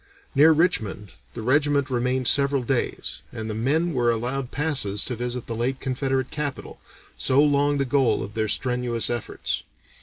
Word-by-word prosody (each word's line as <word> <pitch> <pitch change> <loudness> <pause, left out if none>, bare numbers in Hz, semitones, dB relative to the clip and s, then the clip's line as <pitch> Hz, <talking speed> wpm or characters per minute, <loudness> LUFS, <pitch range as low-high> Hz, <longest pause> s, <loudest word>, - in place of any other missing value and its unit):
Near 155 +3 +7
Richmond 115 - 0 0.2
the 115 - -5
regiment 140 +2 +2
remained 125 +1 0
several 140 0 +2
days, 125 +1 -2
and 110 0 -5
the 110 - -3
men 150 +10 0
were 120 -3 +2
allowed 125 +3 -1
passes 135 -10 0
to 125 - -3
visit 120 +1 -4
the 115 - -4
late 130 +3 -1
Confederate 130 0 -1
capital, 145 -2 -5 0.4
so 130 +1 +2
long 145 0 +3
the 140 - +1
goal 135 -1 +2
of 100 +2 -8
their 110 0 0
strenuous 125 0 0
efforts. 120 -2 -3
130 Hz, 160 wpm, -24 LUFS, 120-140 Hz, 0.4 s, Near